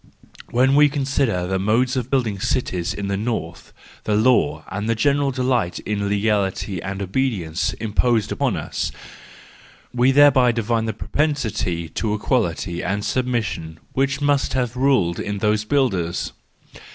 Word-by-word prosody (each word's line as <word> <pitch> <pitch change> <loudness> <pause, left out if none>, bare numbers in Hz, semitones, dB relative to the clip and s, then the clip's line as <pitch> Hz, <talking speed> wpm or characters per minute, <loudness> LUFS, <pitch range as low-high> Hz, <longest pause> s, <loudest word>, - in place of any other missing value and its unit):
When 130 +3 +3
we 145 +1 +6
consider 135 - 0
the 95 +1 -1
mode 120 +6 +1
of 125 -1 -2
building 120 -7 0
cities 95 -5 -1
in 100 -1 -4
the 100 - -1
north, 95 -6 -4 0.3
the 105 - +1
law 110 -7 +2
and 105 +3 -3
the 115 - +2
general 140 +4 +2
delight 125 -8 0
in 100 -1 -2
legality 100 -2 0
and 95 +1 -4
obedience, 95 -6 -1
impose 110 +1 0
upon - - 0
us: - - -3 1.0
we 125 +2 +3
thereby 135 -3 +5
divine 115 0 0
the 110 - -2
propensity 110 - -1
to 105 +5 -2
equality 90 -7 -1
and 100 +3 -2
submission 110 -12 -2
which 135 +1 0
must 145 -1 +1
have 125 -2 -1
ruled 125 -10 +2
in 105 0 -3
those 105 +1 +1
builders. 100 -11 0
110 Hz, 140 wpm, -21 LUFS, 100-130 Hz, 1.0 s, we